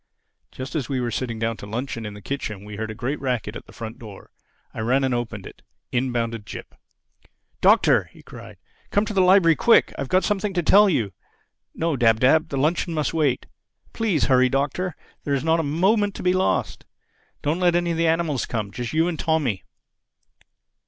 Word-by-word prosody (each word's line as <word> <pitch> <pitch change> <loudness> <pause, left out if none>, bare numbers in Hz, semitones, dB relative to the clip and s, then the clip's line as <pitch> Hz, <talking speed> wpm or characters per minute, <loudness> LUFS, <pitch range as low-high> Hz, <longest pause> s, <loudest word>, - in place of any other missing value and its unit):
Just 130 +1 -7
as 140 -6 -2
we 135 -2 -1
were 120 -1 -2
sitting 115 -2 -3
down 115 0 -2
to 100 - -9
luncheon 115 0 -4
in 105 - -8
the 105 - -12
kitchen 105 -8 -5
we 105 0 -8
heard 110 +1 -4
a 110 - -6
great 130 +6 -3
racket 125 -5 -2
at - - -9
the - - -14
front 115 -1 -8
door. 105 -4 -12 0.4
I - - -7
ran 125 +5 +1
and 130 -1 +1
opened 115 -5 -4
it. - - -12 0.3
In 125 +1 0
bounded 115 -2 -2
Jip. 100 - -9 0.9
"Doctor!" - - +5
he - - -19
cried, - - -12 0.3
"come 205 - +2
into 215 - -4
the 195 - +3
library 180 -3 +5
quick. 230 +9 +4
I've 140 - -3
got 185 +1 +3
something 205 -1 -1
to 175 - +1
tell 205 +5 +6
you—No, 145 - -4
Dab 115 -2 +4
Dab, 155 +6 +4
the 140 - -3
luncheon 160 +4 0
must 150 0 -1
wait. 145 -6 +1 0.5
Please 210 -9 0
hurry, 130 -1 +4
Doctor. 145 +6 -1 0.3
There's 140 -1 -1
not 160 +1 +2
a - - +2
moment 190 +7 +1
to - - -7
be 180 0 +3
lost. 185 0 0 0.6
Don't 155 +4 0
let 175 -1 +3
any 175 0 +1
of 165 - -2
the 165 0 +2
animals 160 -5 0
come—just 115 +2 -4
you 160 +2 +2
and 170 -3 -3
Tommy." 145 - 0
140 Hz, 195 wpm, -23 LUFS, 115-170 Hz, 0.9 s, tell